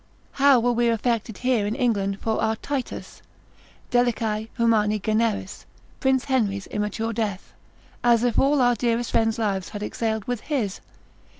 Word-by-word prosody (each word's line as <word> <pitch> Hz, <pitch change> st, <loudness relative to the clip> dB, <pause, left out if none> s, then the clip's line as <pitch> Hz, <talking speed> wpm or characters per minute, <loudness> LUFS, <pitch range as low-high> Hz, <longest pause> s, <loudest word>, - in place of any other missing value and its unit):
How 275 Hz, -2 st, +5 dB
were 245 Hz, +1 st, +2 dB
we 240 Hz, 0 st, +2 dB
affected 230 Hz, -1 st, -1 dB
here 250 Hz, -5 st, +1 dB
in 215 Hz, -, -2 dB
England 200 Hz, -6 st, 0 dB
for 220 Hz, -1 st, -1 dB
our 220 Hz, 0 st, +1 dB
Titus, 270 Hz, +2 st, -5 dB, 0.7 s
deliciae, 225 Hz, -3 st, +1 dB
humani 215 Hz, -3 st, +3 dB
generis, 215 Hz, -2 st, -1 dB, 0.3 s
Prince 265 Hz, -2 st, +2 dB
Henry's 205 Hz, -8 st, 0 dB
immature 210 Hz, +2 st, -3 dB
death, 210 Hz, -4 st, -3 dB, 0.5 s
as 235 Hz, -1 st, +4 dB
if 245 Hz, -2 st, +2 dB
all 280 Hz, 0 st, +3 dB
our 245 Hz, 0 st, +4 dB
dearest 235 Hz, 0 st, -1 dB
friends' 225 Hz, 0 st, +2 dB
lives 200 Hz, -4 st, -1 dB
had 205 Hz, 0 st, -6 dB
exhaled 220 Hz, 0 st, -2 dB
with 245 Hz, -2 st, -2 dB
his? 245 Hz, -10 st, -2 dB
230 Hz, 145 wpm, -24 LUFS, 210-245 Hz, 0.7 s, How